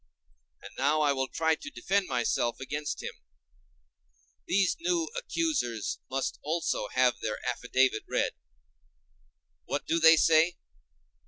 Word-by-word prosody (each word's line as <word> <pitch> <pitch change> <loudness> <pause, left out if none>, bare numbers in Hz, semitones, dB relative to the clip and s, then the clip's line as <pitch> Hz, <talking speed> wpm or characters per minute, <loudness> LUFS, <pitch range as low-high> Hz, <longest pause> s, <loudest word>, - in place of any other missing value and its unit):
And - - -10
now 145 +3 +2
I 145 -2 +3
will 135 -1 -1
try 160 +3 +1
to 295 - -6
defend 200 -8 -1
myself 120 -1 0
against 150 +3 -4
them: - - -5 1.4
these 195 0 +2
new 340 -1 0
accusers 320 - -1
must 135 0 -2
also 155 -8 -1
have 125 0 +2
their 110 - -2
affidavit 125 -1 +1
read. - - +1 1.3
What - - -3
do 165 - +1
they 165 0 +8
say? 165 +2 +4
150 Hz, 120 wpm, -29 LUFS, 130-180 Hz, 1.4 s, they